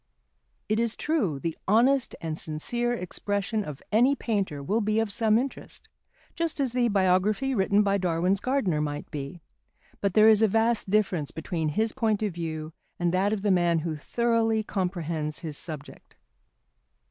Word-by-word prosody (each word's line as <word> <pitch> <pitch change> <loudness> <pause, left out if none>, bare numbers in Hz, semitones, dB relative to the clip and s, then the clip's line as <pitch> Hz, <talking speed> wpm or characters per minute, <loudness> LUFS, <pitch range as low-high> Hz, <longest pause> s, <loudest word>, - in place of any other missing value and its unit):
It 215 +1 +1
is 230 -1 +1
true, 235 - 0
the 160 +4 -3
honest 245 +6 +3
and 160 -1 -3
sincere 235 +11 -2
expression 205 0 -2
of 150 -6 -8
any 245 +6 +4
painter 195 - -2
will 210 +10 0
be 215 +1 +1
of 225 -2 -1
some 220 -2 +3
interest, 265 +3 -5 0.4
just 335 -2 -2
as 265 -4 0
the 245 -1 +2
biography 200 +6 +2
written 200 -1 +3
by 200 0 +1
Darwin's 180 +2 +1
gardener 205 - 0
might 145 -1 -4
be; 150 +3 -6 0.6
but 200 -2 -1
there 215 0 +7
is 220 -1 +6
a 220 - +6
vast 225 0 +1
difference 190 -7 +1
between 160 -1 -3
this 220 0 +1
point 220 -4 0
of 205 -4 -1
view 160 -2 -5 0.2
and 175 0 0
that 195 +3 +2
of 210 -2 -2
the 205 - +2
man 175 -2 +3
who 160 -2 -2
thoroughly 225 +5 +1
comprehends 170 -6 -3
his 155 -4 -5
subject. 150 -2 -9
200 Hz, 165 wpm, -27 LUFS, 165-225 Hz, 0.6 s, there